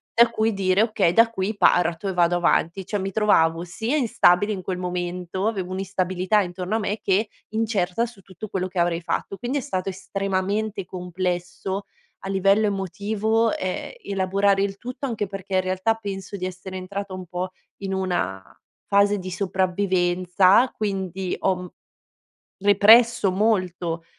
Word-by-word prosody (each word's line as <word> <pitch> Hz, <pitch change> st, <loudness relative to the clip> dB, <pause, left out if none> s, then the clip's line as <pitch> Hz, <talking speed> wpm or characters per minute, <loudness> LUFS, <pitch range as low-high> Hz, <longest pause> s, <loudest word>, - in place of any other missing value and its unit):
da 235 Hz, 0 st, +6 dB
cui 225 Hz, -1 st, 0 dB
dire: 195 Hz, +1 st, +2 dB
"Okay, 215 Hz, -6 st, +2 dB
da 230 Hz, +2 st, +5 dB
qui 200 Hz, 0 st, -2 dB
parto 175 Hz, -1 st, +3 dB
e 190 Hz, -, -1 dB
vado 175 Hz, -1 st, +3 dB
avanti." 175 Hz, +2 st, +1 dB
Cioè, 205 Hz, +1 st, -2 dB
mi 195 Hz, +1 st, -2 dB
trovavo 170 Hz, -6 st, +3 dB
sia 220 Hz, -, -2 dB
instabile 205 Hz, -6 st, +3 dB
in 190 Hz, -, -5 dB
quel 180 Hz, 0 st, -3 dB
momento, 180 Hz, +1 st, -3 dB
avevo 190 Hz, -5 st, -2 dB
un'instabilità 185 Hz, +1 st, 0 dB
intorno 180 Hz, +2 st, -3 dB
a -, -, +1 dB
me 210 Hz, 0 st, -2 dB
che 205 Hz, +3 st, +1 dB, 0.3 s
incerta 220 Hz, -1 st, 0 dB
su 225 Hz, -4 st, -12 dB
tutto 190 Hz, +3 st, -9 dB
quello 185 Hz, -1 st, -2 dB
che 185 Hz, 0 st, -11 dB
avrei 170 Hz, 0 st, +1 dB
fatto. 175 Hz, +3 st, -3 dB
Quindi, 250 Hz, +4 st, -2 dB
è -, -, -5 dB
stato 195 Hz, -8 st, -3 dB
estremamente 195 Hz, +2 st, -2 dB
complesso 180 Hz, +1 st, -3 dB, 0.4 s
a -, -, -4 dB
livello 195 Hz, +2 st, +3 dB
emotivo, 205 Hz, +4 st, 0 dB
ehm, 185 Hz, -, -4 dB
elaborare 195 Hz, -, +1 dB
il 195 Hz, -1 st, -3 dB
tutto, 250 Hz, +4 st, -5 dB
anche 225 Hz, -4 st, -2 dB
perché, 195 Hz, 0 st, -5 dB
in 185 Hz, -, +4 dB
realtà, 185 Hz, +4 st, 0 dB
penso 200 Hz, -2 st, -6 dB
di 185 Hz, -, -4 dB
essere 185 Hz, +1 st, -6 dB
entrata 195 Hz, +1 st, -5 dB
un 185 Hz, -1 st, -7 dB
po' 180 Hz, +2 st, -3 dB, 0.3 s
in 195 Hz, -1 st, -4 dB
una 180 Hz, -, -1 dB, 0.5 s
fase 200 Hz, +1 st, +3 dB
di 185 Hz, 0 st, -6 dB
sopravvivenza, 185 Hz, +2 st, +2 dB
quindi 190 Hz, -3 st, -2 dB
ho 190 Hz, -1 st, +2 dB
m 180 Hz, 0 st, -8 dB, 1.0 s
represso 210 Hz, +1 st, +6 dB
molto 180 Hz, -5 st, 0 dB
190 Hz, 155 wpm, -23 LUFS, 180-205 Hz, 1.0 s, da